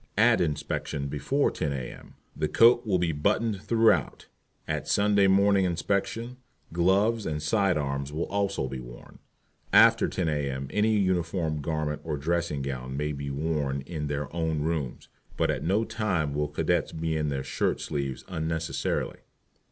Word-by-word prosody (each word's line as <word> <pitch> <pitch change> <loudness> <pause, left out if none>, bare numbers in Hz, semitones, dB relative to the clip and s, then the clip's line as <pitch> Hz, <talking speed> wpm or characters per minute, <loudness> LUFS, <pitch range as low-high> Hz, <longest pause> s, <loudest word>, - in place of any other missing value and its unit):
at - - +5
Inspection 75 -2 -2
before 75 - 0
10 75 - -2
A.M. 65 -3 -7 0.2
the - - 0
coat 120 0 +5
will 95 -3 +3
be 85 -2 +1
buttoned 95 +7 0
throughout; 115 0 +2 0.4
at - - -2
Sunday 100 -1 +3
Morning 100 0 +4
Inspection 100 +7 -1 0.4
gloves 100 +6 +2
and 75 -1 -2
side 90 +3 +2
arms 70 -1 -2
will 80 +3 -2
also 100 -7 -1
be 65 0 -5
worn. - - -12 0.5
After - - +6
10 90 -3 -2
A.M. 70 -3 -2
any 110 +1 +2
uniform 85 -5 0
garment 75 -1 -2
or 75 -2 -3
dressing 80 -1 -1
gown 65 -1 -4
may 75 +1 -1
be 70 -1 -5
worn 70 -1 -1
in 75 +1 -5
their 75 +1 -4
own 80 -2 0
rooms, 80 -6 -3 0.3
but - - +2
at - - -3
no 100 +6 +2
time 90 -12 -1
will 75 +1 0
Cadets 75 - 0
be 80 0 -2
in 75 -1 0
their 70 -1 -2
shirt - - -1
sleeves 70 -2 -3
unnecessarily. 80 -1 -2
80 Hz, 155 wpm, -27 LUFS, 70-95 Hz, 0.5 s, After